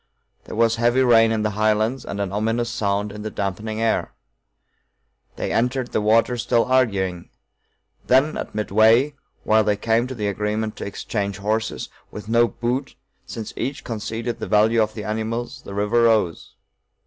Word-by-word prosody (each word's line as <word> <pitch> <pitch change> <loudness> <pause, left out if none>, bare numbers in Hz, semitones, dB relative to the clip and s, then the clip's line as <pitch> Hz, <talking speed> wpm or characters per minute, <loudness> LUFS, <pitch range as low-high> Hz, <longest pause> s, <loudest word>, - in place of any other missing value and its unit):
There - - -7
was 115 +1 +2
heavy 120 +3 +3
rain 115 -2 +5
in 110 -1 0
the 105 - 0
highlands 110 +4 +1
and 100 - -5
an 100 -2 -2
ominous 115 +3 -1
sound 100 -2 -1
in 105 +1 -8
the 110 - -4
dampening 105 +2 -4
air. 115 0 0 1.2
They - - -3
entered 125 +2 0
the - - 0
water 115 +3 +3
still 115 +1 +2
arguing. 100 -9 0 0.8
Then, 135 +5 +3
at - - -6
midway, 110 +7 +4 0.3
while 110 0 +4
they 105 -1 +1
came 115 +3 +1
to 130 - -6
the 105 -3 -2
agreement 105 +2 -2
to - - -5
exchange 100 -1 -3
horses, 110 +3 -2 0.2
with 105 0 -9
no 115 +1 +4
'boot,' 125 +4 -3 0.3
since 110 -2 -6
each 135 +4 -4
conceded 115 +1 -4
the - - -4
value 110 +2 +4
of 110 0 -1
the 105 - -5
animals, 115 +5 -3
the 100 - -9
river 105 +4 +2
rose. 110 -7 +1
110 Hz, 165 wpm, -22 LUFS, 105-120 Hz, 1.2 s, rain